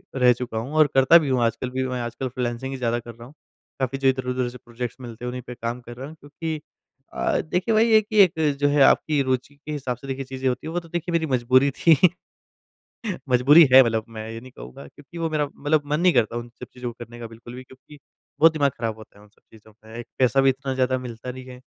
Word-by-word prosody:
रह 125 -2 +5
चुका 120 -2 -6
हूँ 125 +6 -5
और 155 -1 +6
करता 135 +5 +7
भी 155 -4 0
हूँ 130 -2 +1
आजकल 115 +2 -1
भी, 130 +1 -2
मैं 125 -1 -3
आजकल 120 +2 -4
फ्रीलांसिंग 125 +1 -4
ही - - -5
ज़्यादा 120 -2 -1
कर 120 0 -10
रहा 115 0 -12
हूँ। 135 - -17 0.5
काफ़ी 130 0 -1
जो 135 0 0
इधर-उधर 130 -1 0
से 125 - -11
प्रोजेक्ट्स 120 0 -7
मिलते 120 -1 -8
हैं - - -3
उन्हीं 125 +1 -6
पे 125 - -6
काम 115 +1 -4
कर 120 0 -10
रहा 135 +2 -7
हूँ 155 - -11
क्योंकि 155 +2 -6 0.5
अ, - - 0
देखिए 180 +8 -1
वहीं 225 +1 +4
है 220 - +7
कि 215 0 -5
एक 180 - +2 0.3
जो 145 - +3
है 145 0 +2
आपकी 150 +1 +3
रुचि 130 +1 -2
के 150 +2 -10
हिसाब 130 -5 -3
से 135 - -12
देखिए 135 0 -4
चीज़ें 130 0 -4
होती 125 +4 -4
हैं। - - -5
वो 175 - 0
तो 170 -1 -16
देखिए 175 +1 -4
मेरी 165 -1 +1
मजबूरी 130 +1 +3
थी 165 -3 +5 1.3
मजबूरी 135 +6 +7
है 130 - +11
मतलब 110 -2 -1
मैं 110 -1 -8
ये 115 0 -7
नहीं 130 +1 -13
कहूँगा 65 - -11
क्योंकि 145 - -14
वो 165 -1 -1
मेरा 155 -1 0
मतलब 150 +1 +1
मन 150 +1 -1
नहीं 180 0 +4
करता 120 -1 +1
उन 120 0 -7
सब 125 +1 -11
चीज़ों 125 -1 -6
को - - -18
करने 120 0 -13
का 115 - -6
बिल्कुल 115 +2 -12
भी 130 - -9
क्योंकि 130 +3 -17 0.4
बहुत 165 +1 +7
दिमाग 145 -3 +1
ख़राब 115 -2 -3
होता 110 -2 -15
है - - -17
उन 105 - -20
सब 105 - -34
चीज़ों 110 -1 -18
में। 110 +1 -12
एक 120 - -8
पैसा 130 +1 +3
भी 135 - +4
इतना 135 0 -2
ज़्यादा 130 0 +1
मिलता 125 0 -7
नहीं 130 0 -10
है 125 -1 -11
130 Hz, 260 wpm, -23 LUFS, 120-145 Hz, 1.3 s, है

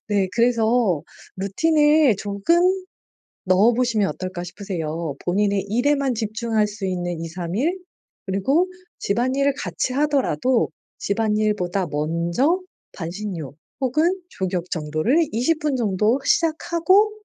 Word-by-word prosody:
네. 200 -2 +1
그래서 230 -6 +2 0.3
루틴을 295 +5 +3
조금 200 - 0 0.9
넣어 195 +6 +4
보시면 230 -5 +1
어떨까 185 -1 -5
싶으세요. 170 -5 -4
본인의 200 +2 +1
일에만 275 +4 +1
집중할 220 0 0
수 205 -1 -6
있는 175 -2 -2
2-3 170 +1 -5
일 320 - 0 0.5
그리고 265 - +1 0.3
집안일을 260 +6 +1
같이 180 +7 -2
하더라도 260 - +1 0.3
집안일보다 210 -3 0
먼저 170 - 0 0.3
반신욕 170 -4 -6 0.3
혹은 310 +8 +2
족욕 180 -2 -3
정도를 160 - +1
20 260 +9 +1
분 300 -2 0
정도 215 +1 +1
시작하고 340 +5 +3
210 Hz, 245 characters per minute, -22 LUFS, 185-265 Hz, 0.9 s, 넣어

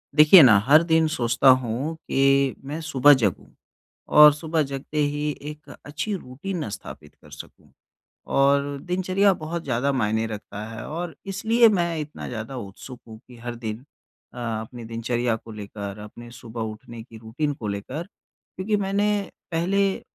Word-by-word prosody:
देखिए 155 +4 +9
ना 110 -6 +7
हर 155 +5 +6
दिन 160 0 +4
सोचता 120 -3 +2
हूँ 130 +4 +2
कि 135 0 +2
मैं 150 +3 -4
सुबह 145 -1 +6
जगूँ 100 -5 -1 0.7
और 150 0 +10
सुबह 160 +1 -1
जगते 140 +2 -5
ही 145 0 0 0.2
एक 150 0 -13 0.2
अच्छी 155 +8 -4
रूटीन 165 - -5
स्थापित 75 -7 -10
कर - - -20
सकूँ - - -13 0.7
और 140 +1 +2
दिनचर्या 185 +2 +2
बहुत 165 +1 -4
ज़्यादा 130 +2 0
मायने 110 -4 0
रखता 105 -1 -7
है 110 -1 -8
और 165 0 -5 0.2
इसलिए 225 +4 +4
मैं 170 -1 -1
इतना 150 0 -7
ज़्यादा 115 +2 -6
उत्सुक 120 +4 -9
हूँ 110 -1 -11
कि 125 - -14
हर 120 +1 -6
दिन 110 -2 -5 0.6
अ, - - -14
अपनी 115 0 -5
दिनचर्या 115 +1 -1
को 115 0 -11
लेकर 100 -1 -7
अपने 120 +3 -11
सुबह 120 -1 -8
उठने 115 +2 -11
की 115 -1 -14
रूटीन 120 +7 -3
को 115 -6 -7
लेकर। 105 +10 -5
क्योंकि 195 +2 -6
मैंने 200 +1 0 0.4
पहले 190 +4 +1
अ, - - -16
135 Hz, 160 wpm, -24 LUFS, 115-160 Hz, 0.7 s, और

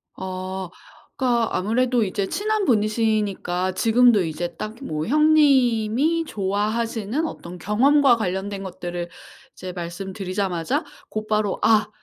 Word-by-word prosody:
아. 185 0 -5 0.5
그러니까 240 -3 +1
아무래도 240 +4 +1
이제 195 0 -2
친한 430 0 0
분이시니까 210 - 0
지금도 230 0 +4
이제 170 +1 -4
딱 215 +5 -6
뭐 155 - -3
형님이 285 0 +3
좋아하시는 220 +5 -1
어떤 180 - -7
경험과 250 - +4
관련된 195 0 -3
것들을 175 -2 -5 0.4
이제 185 0 -7
말씀드리자마자 185 0 -3 0.2
곧바로 215 -2 -1
"아 220 -1 +4
210 Hz, 285 characters per minute, -23 LUFS, 185-240 Hz, 0.5 s, 지금도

